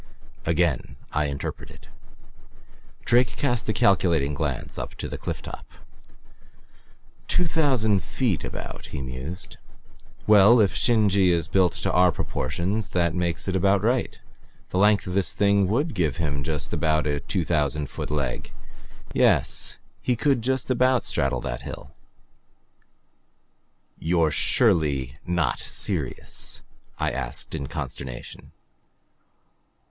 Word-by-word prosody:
Again 85 -4 0 0.2
I 75 0 0
interpreted. 70 -1 -6 1.2
Drake 120 0 +3
cast 120 -5 -1
a - - +5
calculating 85 -9 +2
glance - - -3
up - - -6
to - - -5
the - - -6
cliff - - -5
top. - - -8 1.6
"Two 180 - +2
thousand 130 - +2
feet, 60 -4 -1
about," - - -7
he 75 - -6
mused. 70 +8 -6 0.7
"Well, 105 +3 +7
if 100 -4 +3
Shin 110 -3 +3
je 95 -1 +3
is 85 -3 +1
built 90 -1 +1
in - - +2
our 90 0 +5
proportions 95 +6 -2
that 85 -2 +2
makes 85 0 -2
it 95 - -1
about 95 +1 +3
right. 120 +3 0 0.5
The 90 - 0
length 105 +1 +4
of 90 - -4
this 95 -3 +2
thing 100 -1 +3
would 140 - 0
give 80 -7 0
him 70 -4 -2
just 75 0 -3
about 80 -2 +1
a 75 -1 0
two 85 +4 -2
thousand 75 -2 0
foot - - -6
leg. 70 -4 -3 0.6
Yes - - +3 0.2
he 125 - +1
could 135 0 +1
just 130 +2 0
about 130 0 +3
straddle 65 -3 0
that - - -4
hill." - - -8 2.1
"You're 80 -2 +2
surely 70 -5 +2
not 90 0 0
serious?" - - -1 0.3
I - - 0
asked 65 -3 -3
in 70 - -4
consternation. 65 -2 -7
90 Hz, 130 wpm, -25 LUFS, 75-105 Hz, 2.1 s, Well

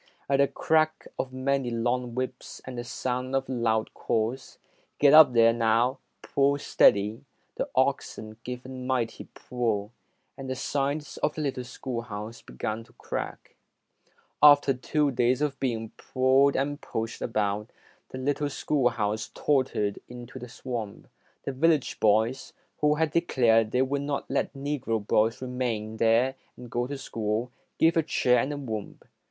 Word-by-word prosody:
At 140 - +2
the 140 0 +4
crack 155 +1 +1
of 130 - -2
many 130 0 0
long 120 +1 -1
whips 130 0 -5
and 130 - -7
the 120 - -4
sound 125 +1 -3
of 135 0 0
loud 115 -3 0
calls, 115 +4 -2 0.4
"Get 145 0 +5
up 155 -4 +9
there, 115 -1 +6
now! 115 +3 +2 0.2
Pull 140 +1 +2
steady", 105 -5 +3 0.3
the - - -3
oxen 110 0 -1
gave 125 0 -6
a - - -8
mighty 130 -3 -2
pull, 115 -4 -2 0.4
and 135 -1 -7
the 130 - -2
sides 140 +3 -2
of 150 - -1
the 155 - -3
little 130 -3 -2
schoolhouse 115 -3 -6
began 110 - -5
to - - -23
crack. - - -6 0.9
After 145 -1 +7
two 145 +3 0
days 125 0 +2
of 145 -2 -1
being 115 -4 -2
pulled 130 +2 +2
and 145 +2 -1
pushed 115 +1 -4
about, 105 -1 -1 0.4
the - - -7
little 145 +2 -1
schoolhouse 115 -7 0
tottered 130 -8 0
into 125 +1 -9
the 125 0 -9
swamp. 115 -4 -6 0.3
The - - -3
village 150 +1 +1
boys, 110 +5 +2 0.3
who 150 0 +3
had 160 -1 0
declared 120 -9 +3
they 125 +3 +2
would 140 +1 -1
not 140 0 -3
let - - 0
the 145 +1 -3
Negro 115 -3 -2
boys 110 +4 +2
remain 120 -4 -3
there 115 +4 +3 0.2
and 120 -2 -11
go 120 +1 -1
to 140 +1 -5
school, 115 -1 -3 0.3
gave 165 +1 +4
a 165 - +4
cheer 125 -5 +2
and 135 +5 -1
a 145 - -4
whoop. 110 -7 -6
125 Hz, 155 wpm, -27 LUFS, 115-140 Hz, 0.9 s, up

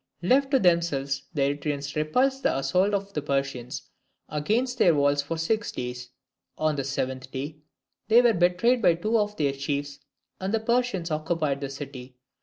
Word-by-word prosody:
Left 270 +8 +3
to 270 - +4
themselves, 145 - +1
the 140 - +2
Eretrians 145 0 -2
repulsed 255 - +1
the - - +1
assaults 185 +9 +2
of 200 0 -4
the 150 - -2
Persians 135 -3 -2 0.5
against 230 - 0
their 170 -3 +5
walls 145 0 +3
for 160 +3 -4
six 210 +7 -1
days; 125 0 -5 0.5
on 155 -1 +1
the 140 - -2
seventh 130 -1 -3
day 140 +4 -5 0.5
they 225 +2 +7
were 235 -2 +5
betrayed 180 +8 +3
by 170 - +5
two 215 +6 +1
of 210 0 -1
their 140 -3 +1
chiefs 140 +1 -3 0.4
and 195 +3 -1
the - - +1
Persians 220 -7 0
occupied 155 -2 -1
the 140 - -3
city. 135 -2 -8
155 Hz, 170 wpm, -26 LUFS, 140-205 Hz, 0.5 s, they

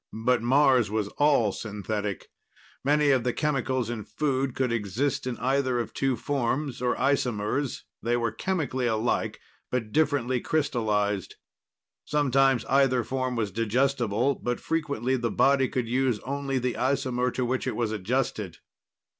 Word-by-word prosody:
But 125 -2 +3
Mars 130 -2 +4
was 105 -1 -1
all 140 -8 +4
synthetic. 105 0 -4 0.5
Many 145 +1 +3
of 130 -3 +3
the 125 0 0
chemicals 130 -5 0
in 110 -3 -4
food 135 -2 -1
could 130 -2 0
exist 115 +5 -1
in 125 -2 -3
either 130 0 +1
of 115 - -4
two 135 -1 0
forms, 135 +1 -2
or 125 - +1
isomers; 130 -1 0 0.2
they 120 +1 +1
were 115 -2 0
chemically 145 -9 -1
alike, 110 +1 0 0.3
but 115 -4 -2
differently 135 -5 +1
crystallized. 105 - 0 0.7
Sometimes 135 -4 +2
either 135 -3 +3
form 130 0 -2
was 110 -4 -1
digestible, 120 +2 +1
but 120 -1 -3
frequently 140 -6 -1
the 120 -1 -1
body 135 +1 +3
could 125 -3 -2
use 125 -1 +1
only 140 0 -2
the 125 -1 -1
isomer 130 -1 0
to 130 - 0
which 130 +1 -1
it - - -1
was 115 -3 -1
adjusted. 105 -4 -2
125 Hz, 145 wpm, -27 LUFS, 115-135 Hz, 0.7 s, Mars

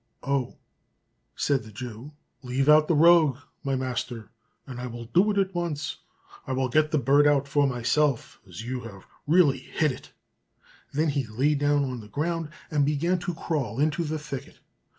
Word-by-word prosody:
"Oh!" 140 -3 -1 0.8
said 140 -2 +1
the 110 0 -12
Jew, 120 +6 -8 0.3
"leave 130 +1 -1
out 155 0 +6
the 165 - +2
rogue, 160 -3 +6 0.3
my 135 -1 0
master, 125 -3 -4 0.3
and 125 -2 -7
I 125 - -4
will 120 -1 -7
do 180 - +3
it 205 - 0
at 195 -1 +1
once. 170 -4 -3 0.5
I 130 - -2
will 130 0 0
get 155 +4 +3
the 155 - +1
bird 140 +2 +4
out 140 -1 +2
for 140 0 +2
myself, 135 +2 0
as 90 +3 -8
you 115 -5 -6 0.2
really 150 -5 +4
have 125 - -17
hit 155 -2 +4
it." 125 - -11 0.8
Then 155 +3 +1
he 140 -4 -1
lay 130 +8 +1
down 145 0 +2
on 130 -2 -4
the 105 - -11
ground, 165 +6 -2 0.2
and 150 -2 +2
began 155 +5 +1
to 175 -1 -4
crawl 135 -9 -3
into 155 +3 +1
the 155 0 -2
thicket. 140 -3 -8
140 Hz, 180 wpm, -26 LUFS, 125-155 Hz, 0.8 s, out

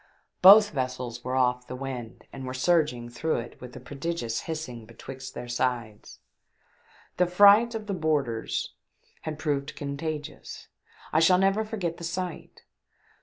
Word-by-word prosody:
Both 205 +3 +9
vessels 125 -4 -4
were 130 +1 -2
off 125 -1 +1
the 125 - -6
wind 125 -3 -7
and 135 - -7
were 130 0 -5
surging 140 -5 +1
through 155 +7 -2
it 120 0 -6
with 125 -1 -10
a - - -7
prodigious 135 -2 -3
hissing 125 -8 -5
betwixt 130 +3 -9
their 120 - -6
sides. 120 -3 -3 1.0
The 180 - +3
fright 205 +6 +6
of 220 -1 -4
the 205 - -3
boarders 150 -9 -1 0.5
had 155 -1 -5
proved 145 -2 -2
contagious. 145 +1 -6 0.4
I 155 - +5
shall 180 +3 +5
never 195 +3 +2
forget 200 -7 -4
the - - -10
sight 175 0 -5
140 Hz, 145 wpm, -27 LUFS, 125-170 Hz, 1.0 s, Both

